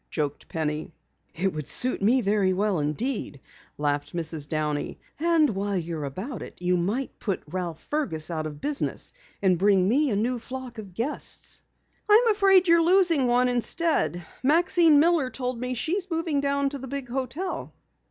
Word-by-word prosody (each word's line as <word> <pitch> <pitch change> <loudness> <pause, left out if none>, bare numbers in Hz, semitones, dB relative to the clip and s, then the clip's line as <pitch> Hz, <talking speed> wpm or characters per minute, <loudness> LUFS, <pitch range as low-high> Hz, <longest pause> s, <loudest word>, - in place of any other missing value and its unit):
joked 145 -2 -3
Penny. 155 0 -3 0.4
"It 190 +3 0
would 155 -2 -5
suit 255 -3 +4
me 240 +6 +3
very 200 -3 +2
well 195 -2 0
indeed," 150 - -2 0.4
laughed 145 +1 -2
Mrs. 160 -3 -2
Downey. 150 -2 -2 0.2
"And 325 -3 +3
while 200 0 -2
you're 165 -3 -4
about 195 - -6
it - - -9
you 180 0 +1
might 205 +10 -2
put 195 -5 -3
Ralph 170 0 -4
Fergus 180 - -1
out 155 -1 -2
of 150 -1 -9
business, 290 - -3 0.3
and 185 -3 +3
bring 195 -1 +4
me 280 +7 +2
a 210 - 0
new 240 +4 0
flock 255 0 -8
of 195 -4 -10
guests." 245 +8 -3 0.5
"I'm 455 +3 +6
afraid 390 -3 +4
you're 335 0 +5
losing 340 -6 +4
one 245 +1 +3
instead. 245 - 0 0.2
Maxine 325 +2 +4
Miller 320 -4 +3
told 250 -2 -4
me 250 +1 -3
she 280 +7 -2
is 385 -1 -4
moving 325 -4 -1
down 280 0 +1
to 280 0 -6
the 265 - -7
big 275 0 -5
hotel." 265 +9 -4
240 Hz, 170 wpm, -26 LUFS, 175-290 Hz, 0.5 s, I'm